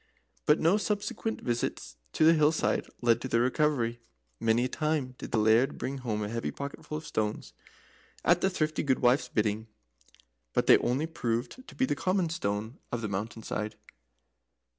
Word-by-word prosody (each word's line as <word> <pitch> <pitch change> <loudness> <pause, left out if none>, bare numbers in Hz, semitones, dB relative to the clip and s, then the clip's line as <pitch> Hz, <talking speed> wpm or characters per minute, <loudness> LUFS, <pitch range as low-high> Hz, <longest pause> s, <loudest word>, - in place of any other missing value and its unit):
But 150 - +5
no 170 +6 +4
subsequent 210 +1 -2
visits 120 - -2 0.2
to 155 - +3
the 165 - +8
hill 155 -1 +4
side 160 - 0
led 120 -2 +3
to - - -3
their 115 -2 +2
recovery. 125 -3 +1 0.4
Many 115 +2 +2
a - - +1
time 150 -2 -1
did - - -6
the - - +1
Laird 110 +6 +3
bring 135 +1 -4
home 110 -4 -2
a - - -2
heavy 115 +1 -2
pocketful 140 +2 -6
of 155 - -8
stones, 105 0 -2 0.7
at 175 0 +4
the 190 - +3
thrifty 155 -4 -1
gudewife's 130 -2 +2
bidding, 110 0 0 0.9
but - - +2
they - - +7
only 130 +6 0
proved 125 - -3
to - - -12
be 260 - +2
the - - 0
common 185 -2 +1
stones 110 -5 -3
of 120 - -2
the 105 - -2
mountain 110 +3 -4
side. 105 0 -3
130 Hz, 175 wpm, -29 LUFS, 115-155 Hz, 0.9 s, the